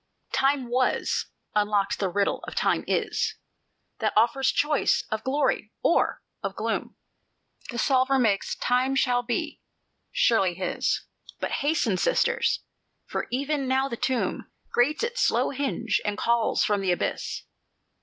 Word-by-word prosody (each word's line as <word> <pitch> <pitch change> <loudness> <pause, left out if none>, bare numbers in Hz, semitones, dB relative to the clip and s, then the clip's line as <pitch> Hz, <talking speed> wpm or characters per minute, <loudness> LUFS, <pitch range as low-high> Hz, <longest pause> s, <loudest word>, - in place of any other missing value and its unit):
"Time 270 -2 +2
Was 250 +1 0 0.3
unlocks 205 -1 +1
the 195 - -1
riddle 200 +2 0
of - - -7
Time - - +1
Is, - - 0 0.6
That 215 -2 0
offers 240 +5 +3
choice 295 -1 +2
of 220 0 -2
glory 265 -5 0
or 340 - +2 0.2
of - - -4
gloom; - - -2 0.7
The 240 - -5
solver 265 +2 +3
makes 215 -6 +1
Time 255 +2 +1
Shall 245 -2 +2
Be 255 +6 -3 0.5
surely 225 - +3
his. 185 0 -1 0.3
But - - -2
hasten, 280 - +1
Sisters! 485 - +1 0.4
for - - -3
even 275 +2 -1
now 265 +1 +2
the 235 - -4
tomb 255 +1 -1 0.2
Grates 290 - +2
its 480 +1 -1
slow - - +2
hinge 265 -4 -1
and 205 0 -2
calls 235 0 +2
from 205 -1 +1
the 190 -2 +1
abyss." 175 - -2
250 Hz, 135 wpm, -26 LUFS, 215-275 Hz, 0.7 s, offers